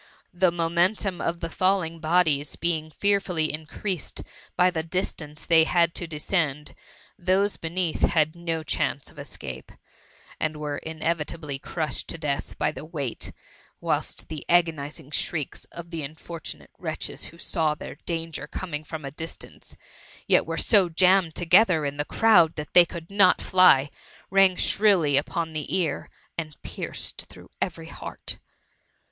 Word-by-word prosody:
The 180 Hz, 0 st, +3 dB
momentum 175 Hz, +3 st, +1 dB
of 170 Hz, 0 st, -2 dB
the 165 Hz, -, -3 dB
falling 185 Hz, -3 st, +1 dB
bodies 155 Hz, -3 st, +2 dB
being 160 Hz, -2 st, 0 dB
fearfully 180 Hz, -3 st, +1 dB
increased 160 Hz, +3 st, -4 dB, 0.3 s
by 180 Hz, 0 st, +5 dB
the 165 Hz, -3 st, -1 dB
distance 160 Hz, -3 st, -4 dB
they 165 Hz, -1 st, +6 dB
had 170 Hz, 0 st, +3 dB
to 175 Hz, -, -3 dB
descend^ 150 Hz, -2 st, -1 dB, 0.5 s
those 190 Hz, +3 st, +2 dB
beneath 170 Hz, 0 st, -1 dB
had 155 Hz, -1 st, +3 dB
no 165 Hz, -2 st, -3 dB
chance 145 Hz, -2 st, -1 dB
of -, -, -22 dB
escape^ -, -, -7 dB, 0.6 s
and 155 Hz, -1 st, -1 dB
were 150 Hz, -1 st, -3 dB
inevitably 160 Hz, -2 st, -3 dB
crushed 155 Hz, +2 st, -3 dB
to -, -, -5 dB
death 145 Hz, -3 st, -3 dB
by -, -, +1 dB
die -, -, -8 dB
wei^t, 150 Hz, -6 st, -4 dB, 0.5 s
whilst -, -, -2 dB
the 155 Hz, -2 st, -6 dB
agonizing 160 Hz, -4 st, +1 dB
shrieks 155 Hz, -2 st, -2 dB
of 170 Hz, 0 st, -10 dB
the 165 Hz, -2 st, -3 dB
unfortunate 160 Hz, +3 st, -8 dB
THE -, -, -32 dB
MUMMY. -, -, -2 dB
283 -, -, -3 dB
wretches -, -, -6 dB
who 170 Hz, -, -16 dB
saw 160 Hz, -2 st, 0 dB
their -, -, -8 dB
danger 165 Hz, -3 st, -3 dB
coming 150 Hz, -2 st, -5 dB
from 155 Hz, -1 st, -7 dB
a 140 Hz, -, -5 dB
distance, 160 Hz, +3 st, -8 dB, 0.5 s
yet -, -, +3 dB
were -, -, -2 dB
so 200 Hz, -5 st, +4 dB
jammed 180 Hz, 0 st, +4 dB
together 175 Hz, -2 st, +4 dB
in 140 Hz, 0 st, -3 dB
the 145 Hz, -, -1 dB
crowd 175 Hz, -7 st, +5 dB
that 150 Hz, -1 st, -6 dB
they 175 Hz, -1 st, +8 dB
eould 170 Hz, +1 st, -8 dB
not 195 Hz, -2 st, +5 dB
fly, 145 Hz, -7 st, +5 dB, 0.4 s
rang 195 Hz, -1 st, +5 dB
shrilly 185 Hz, -9 st, +3 dB
upon 160 Hz, +3 st, 0 dB
the 155 Hz, -2 st, -4 dB
ear, 175 Hz, -4 st, -1 dB, 0.3 s
and 155 Hz, -2 st, -6 dB
pierced -, -, -5 dB
through -, -, -15 dB
every -, -, -3 dB
heart. -, -, -8 dB
165 Hz, 155 wpm, -26 LUFS, 155-180 Hz, 0.6 s, they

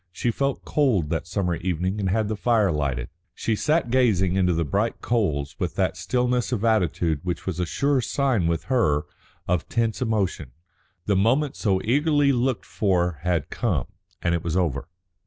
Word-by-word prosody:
She 105 Hz, +7 st, -1 dB
felt 140 Hz, +3 st, -2 dB
cold 115 Hz, -, +1 dB
that 85 Hz, 0 st, -2 dB
summer 90 Hz, -1 st, -1 dB
evening 90 Hz, +3 st, -2 dB
and 95 Hz, -2 st, 0 dB
had 110 Hz, +2 st, +1 dB
the 110 Hz, -, -2 dB
fire 110 Hz, -3 st, +2 dB
lighted. 70 Hz, -5 st, -2 dB, 0.3 s
She 110 Hz, -, -1 dB
sat 150 Hz, +1 st, +1 dB
gazing 100 Hz, -8 st, +3 dB
into 90 Hz, -2 st, +3 dB
the 85 Hz, -1 st, 0 dB
bright 100 Hz, +10 st, -1 dB
coals 80 Hz, -13 st, -1 dB
with -, -, -2 dB
that -, -, 0 dB
stillness 125 Hz, -1 st, 0 dB
of 115 Hz, -3 st, -1 dB
attitude 90 Hz, -8 st, +1 dB
which 90 Hz, 0 st, -4 dB
was 90 Hz, -2 st, -3 dB
a 90 Hz, -, 0 dB
sure 140 Hz, -, +1 dB
sign 120 Hz, -4 st, +1 dB
with 85 Hz, -1 st, -1 dB
her 75 Hz, -, +1 dB, 0.4 s
of 90 Hz, -2 st, 0 dB
tense 115 Hz, -1 st, 0 dB
emotion. 95 Hz, -, -1 dB, 0.5 s
The 100 Hz, -, +2 dB
moment 130 Hz, +9 st, +2 dB
so 95 Hz, -4 st, +1 dB
eagerly 145 Hz, +3 st, +3 dB
looked 125 Hz, -5 st, 0 dB
for 90 Hz, -6 st, 0 dB
had 85 Hz, -3 st, -1 dB
come, 90 Hz, -, -1 dB, 0.3 s
and 85 Hz, -, +2 dB
it 85 Hz, -, -1 dB
was 85 Hz, +1 st, -1 dB
over. 80 Hz, -7 st, -1 dB
100 Hz, 175 wpm, -24 LUFS, 85-120 Hz, 0.5 s, gazing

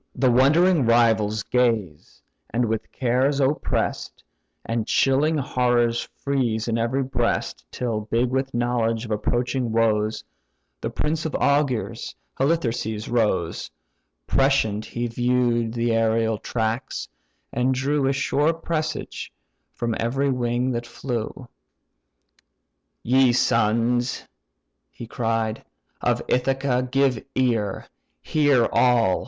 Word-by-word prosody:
The 130 Hz, 0 st, +3 dB
wondering 145 Hz, +4 st, +4 dB
rivals 110 Hz, -3 st, +3 dB
gaze, 115 Hz, -12 st, -1 dB, 0.3 s
with 110 Hz, -2 st, -1 dB
cares 130 Hz, +3 st, +1 dB
oppress'd, 140 Hz, +2 st, -1 dB, 0.4 s
And 115 Hz, -1 st, -2 dB
chilling 145 Hz, +4 st, +2 dB
horrors 120 Hz, -3 st, +1 dB
freeze 120 Hz, -6 st, -1 dB
in 115 Hz, 0 st, 0 dB
every 125 Hz, +4 st, 0 dB
breast, 125 Hz, -3 st, -2 dB
Till 110 Hz, -4 st, -3 dB
big 120 Hz, +2 st, +1 dB
with 135 Hz, +1 st, -1 dB
knowledge 120 Hz, -1 st, 0 dB
of 110 Hz, -, -8 dB
approaching 120 Hz, +3 st, -1 dB
woes, 110 Hz, -1 st, +1 dB, 0.6 s
The -, -, -2 dB
prince 160 Hz, +1 st, -2 dB
of 155 Hz, -, -5 dB
augurs, 140 Hz, -5 st, 0 dB, 0.2 s
Halitherses, 120 Hz, -7 st, -1 dB
rose: 105 Hz, -8 st, 0 dB, 0.6 s
Prescient 110 Hz, -, +1 dB
he 120 Hz, 0 st, -4 dB
view'd 120 Hz, -1 st, +1 dB
the 120 Hz, 0 st, 0 dB
aërial 115 Hz, -1 st, +1 dB
tracks, 115 Hz, +1 st, -3 dB, 0.5 s
and 125 Hz, +2 st, +1 dB
drew 135 Hz, +2 st, 0 dB
A -, -, +3 dB
sure 145 Hz, +3 st, +1 dB
presage 160 Hz, -1 st, -4 dB, 0.4 s
from 120 Hz, -1 st, -2 dB
every 135 Hz, +4 st, 0 dB
wing 125 Hz, 0 st, 0 dB
that 120 Hz, -1 st, -3 dB
flew. 120 Hz, +1 st, -5 dB, 1.6 s
"Ye 130 Hz, 0 st, +4 dB
sons 120 Hz, +1 st, +1 dB, 0.6 s
(he -, -, -9 dB
cried) 115 Hz, -1 st, -2 dB, 0.4 s
of -, -, 0 dB
Ithaca, 130 Hz, 0 st, 0 dB
give 135 Hz, -3 st, +1 dB
ear; 115 Hz, -6 st, 0 dB, 0.4 s
Hear 145 Hz, -6 st, +3 dB
all! 115 Hz, -5 st, +3 dB
120 Hz, 110 wpm, -23 LUFS, 115-135 Hz, 1.6 s, wondering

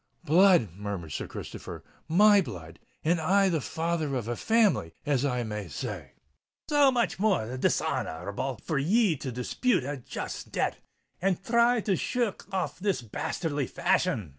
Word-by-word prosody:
"Blood!" 175 Hz, -, +5 dB
murmured 100 Hz, -4 st, -5 dB
Sir -, -, -4 dB
Christopher: -, -, -8 dB, 0.2 s
"my 205 Hz, +5 st, +6 dB
blood! 85 Hz, -, -9 dB, 0.2 s
and 165 Hz, +1 st, +2 dB
I 195 Hz, +4 st, +3 dB
the 165 Hz, -4 st, 0 dB
father 160 Hz, -1 st, -2 dB
of 120 Hz, -4 st, -3 dB
a 120 Hz, -, -2 dB
family, 215 Hz, -, +2 dB
as 140 Hz, -3 st, +1 dB
I 125 Hz, -3 st, 0 dB
may 105 Hz, -3 st, -5 dB
say." 70 Hz, -, -6 dB, 0.6 s
"So 290 Hz, -2 st, +5 dB
much 245 Hz, -3 st, 0 dB
the -, -, -8 dB
more 155 Hz, -, +1 dB
dishonour 130 Hz, -, 0 dB
r 80 Hz, +5 st, -6 dB
able 130 Hz, +4 st, -3 dB
for 155 Hz, -5 st, -1 dB
ye 195 Hz, +4 st, +3 dB
to 130 Hz, -, -5 dB
dispute 125 Hz, -, 0 dB
a 140 Hz, +2 st, -4 dB
just 125 Hz, -, -6 dB
debt, -, -, -1 dB, 0.4 s
and 190 Hz, -1 st, +1 dB
thry 235 Hz, +3 st, +3 dB
to 200 Hz, -2 st, +1 dB
shir 240 Hz, +6 st, 0 dB
rk 195 Hz, -, -18 dB
off 190 Hz, -1 st, -2 dB
in -, -, -7 dB
this 190 Hz, -11 st, +1 dB
bastely 145 Hz, -, -3 dB
fashion!" 180 Hz, -, 0 dB
160 Hz, 170 wpm, -28 LUFS, 120-200 Hz, 0.6 s, my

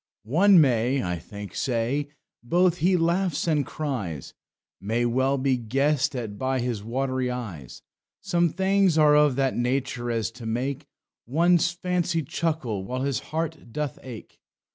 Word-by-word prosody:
"One 175 Hz, -, +5 dB
may 130 Hz, -1 st, +2 dB
(I 90 Hz, -1 st, -2 dB
think) 100 Hz, +4 st, -9 dB
say, 130 Hz, +4 st, -1 dB, 0.3 s
both 175 Hz, +7 st, +2 dB
he 180 Hz, +3 st, +3 dB
laughs 170 Hz, +1 st, 0 dB
and 150 Hz, -3 st, +2 dB
cries, 115 Hz, -, -4 dB, 0.5 s
May 115 Hz, +4 st, -1 dB
well 130 Hz, +3 st, +1 dB
be 130 Hz, -1 st, +1 dB
guessed 135 Hz, +5 st, 0 dB
at 110 Hz, -5 st, -5 dB
by 130 Hz, 0 st, 0 dB
his 120 Hz, -4 st, -2 dB
watery 130 Hz, +2 st, -1 dB
eyes. 100 Hz, -, -7 dB, 0.4 s
Some 175 Hz, -1 st, +1 dB
things 190 Hz, 0 st, +2 dB
are 150 Hz, -1 st, +6 dB
of 150 Hz, -3 st, +4 dB
that 135 Hz, -1 st, 0 dB
nature 125 Hz, 0 st, -1 dB
as 115 Hz, -2 st, -1 dB
to 115 Hz, -1 st, -9 dB
make 135 Hz, +5 st, -3 dB, 0.4 s
One's 170 Hz, +5 st, +3 dB
fancy 175 Hz, -1 st, -1 dB
chuckle 140 Hz, -, -2 dB
while 130 Hz, +6 st, -3 dB
his 135 Hz, -4 st, 0 dB
heart 160 Hz, -5 st, -4 dB
doth 150 Hz, +1 st, -4 dB
ake. 125 Hz, -4 st, -10 dB
135 Hz, 145 wpm, -25 LUFS, 120-160 Hz, 0.5 s, are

